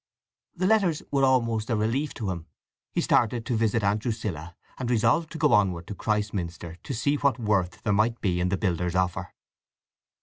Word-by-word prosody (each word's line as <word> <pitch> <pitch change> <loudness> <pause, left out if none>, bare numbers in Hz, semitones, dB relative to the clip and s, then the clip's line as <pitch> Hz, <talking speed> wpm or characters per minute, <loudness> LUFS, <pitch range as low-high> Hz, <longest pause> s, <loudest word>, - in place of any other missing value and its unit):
The 185 +1 -1
letters 190 -6 +2
were 140 -1 +2
almost 115 -4 +2
a 115 - +2
relief 115 +8 0
to 105 -5 -3
him. 85 -2 -6 0.4
He - - 0
started 115 0 +2
to 120 - -1
visit 110 0 +1
Aunt 100 +2 +1
Drusilla, 95 -8 -4 0.2
and 125 -2 -3
resolved 120 +8 +2
to - - -5
go 150 -2 +3
onward 90 -5 +2
to 105 - -6
Christminster 95 -6 -3
to - - -5
see 140 +6 +1
what 140 -2 +2
worth 100 -7 0
there 105 - +1
might 110 +3 +2
be 90 -3 0
in 90 +1 +1
the 100 - 0
builder's 90 -3 -1
offer. 90 -1 -1
110 Hz, 190 wpm, -26 LUFS, 90-125 Hz, 0.4 s, go